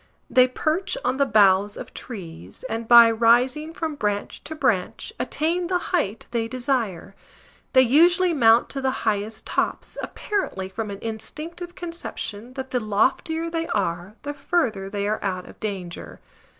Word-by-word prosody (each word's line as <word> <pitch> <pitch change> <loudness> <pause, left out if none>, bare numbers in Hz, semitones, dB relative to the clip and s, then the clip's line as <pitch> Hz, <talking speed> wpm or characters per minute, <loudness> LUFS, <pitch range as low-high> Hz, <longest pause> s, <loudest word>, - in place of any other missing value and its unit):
They 255 -1 +6
perch 320 - -1
on 260 - +1
the 280 0 +2
boughs 205 -2 +4
of - - -8
trees, 165 - -9
and, 225 0 -4
by 235 -1 +9
rising 245 +7 +3
from 320 -1 -3
branch 205 -7 -3
to 315 - -5
branch, 230 -11 -1
attain 340 +3 -1
the 360 0 +1 0.2
height 230 - 0
they 230 -1 -1
desire. 235 -8 -2 0.6
They 260 -1 +7
usually 345 +7 +5
mount 230 -5 +5
to 275 - -4
the 265 - +1 0.2
highest 215 0 -1
tops, - - -2
apparently 195 - -3
from 215 +2 -4
an 200 - -5
instinctive 325 +10 -6
conception 255 - -6
that 265 0 -6
the 250 - +1
loftier 260 +10 0
they 330 0 -2
are 185 0 -2
the 290 0 -4
further 265 - -1
they 200 0 -2
are 215 +1 -1
out 185 -2 -2
of - - -14
danger. 190 -5 -6
235 Hz, 155 wpm, -24 LUFS, 205-305 Hz, 0.6 s, by